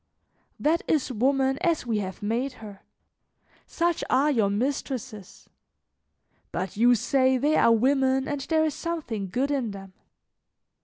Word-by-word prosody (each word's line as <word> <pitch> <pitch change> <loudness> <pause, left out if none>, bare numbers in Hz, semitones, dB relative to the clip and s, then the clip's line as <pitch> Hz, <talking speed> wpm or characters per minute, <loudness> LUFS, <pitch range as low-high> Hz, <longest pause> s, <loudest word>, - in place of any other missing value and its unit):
"That 325 +3 +2
is 290 -4 +1
woman 265 +3 +1
as 335 -7 0
we 225 -3 -1
have 190 0 -6
made 240 +6 -1
her; 210 -5 -12 0.9
such 340 0 -1
are 280 +4 +3
your 220 -7 +2
mistresses. 245 -2 -4 1.0
But 185 -1 -4
you 240 +3 +5
say 260 +2 +2
they 295 +4 +1
are 230 - +5
women 265 +3 +2
and 290 -1 -3
there 315 +3 +1
is 310 - -1
something 265 - -4
good 260 +9 -1
in 265 -5 -1
them! 195 -1 -10
260 Hz, 140 wpm, -26 LUFS, 220-285 Hz, 1.0 s, you